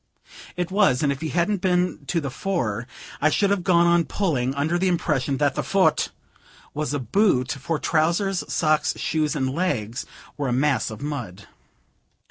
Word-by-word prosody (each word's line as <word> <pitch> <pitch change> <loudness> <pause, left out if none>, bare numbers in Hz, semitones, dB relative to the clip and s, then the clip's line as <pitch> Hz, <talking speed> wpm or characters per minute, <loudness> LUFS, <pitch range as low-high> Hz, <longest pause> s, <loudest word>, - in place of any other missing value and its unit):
It 180 0 -2
was; 190 -10 +3
and 140 - +2
if 140 - -4
he 160 - -2
hadn't 180 +4 0
been 180 -5 0
to 170 - 0
the 140 -4 -4
fore, 120 - -2 0.3
I 155 - +4
should 200 +5 +2
have 200 -3 0
gone 170 -1 +4
on 170 -1 +3
pulling, 135 -6 -1
under 155 +5 0
the 190 - +1
impression 150 -6 0
that 145 -1 +2
the - - -1
"fut" 185 -6 +2 0.6
was 150 0 -2
a 145 - 0
boot, 130 - +2
for 155 +4 -2
trousers, 170 +5 +1
socks, 155 -1 +1
shoes 155 -2 -1
and 135 -3 0
legs 130 - -2 0.3
were 145 -2 -2
a 125 - 0
mass 140 +2 +1
of 110 +4 -8
mud. 120 -10 -5
155 Hz, 175 wpm, -24 LUFS, 135-180 Hz, 0.6 s, I